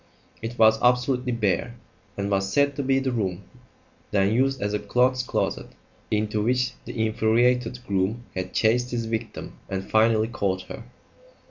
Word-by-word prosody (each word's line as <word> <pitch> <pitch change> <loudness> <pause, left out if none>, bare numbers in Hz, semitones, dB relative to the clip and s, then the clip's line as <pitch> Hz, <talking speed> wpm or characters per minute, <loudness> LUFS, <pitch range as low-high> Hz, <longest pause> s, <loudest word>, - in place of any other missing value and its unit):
It 115 +2 -5
was 110 0 +5
absolutely 125 +1 +2
bare, 115 +2 0 0.4
and 100 0 -2
was 95 0 0
said 140 +2 +2
to 140 - -2
be 135 0 +2
the 135 -1 0
room 100 -5 -2 0.7
then 100 +1 +2
used 135 +3 +1
as 105 +1 -2
a 105 - 0
clothes 125 +5 +2
closet - - -2 0.4
into 105 0 0
which 125 +2 +1
the 110 -2 -2
infuriated 115 +3 +2
groom 100 +4 -1
had 95 0 -4
chased 120 +3 +2
his 120 -2 -2
victim 115 0 -5
and 95 0 -4
finally 110 0 +4
caught 95 -5 -1
her. - - -9
115 Hz, 155 wpm, -25 LUFS, 105-125 Hz, 0.7 s, was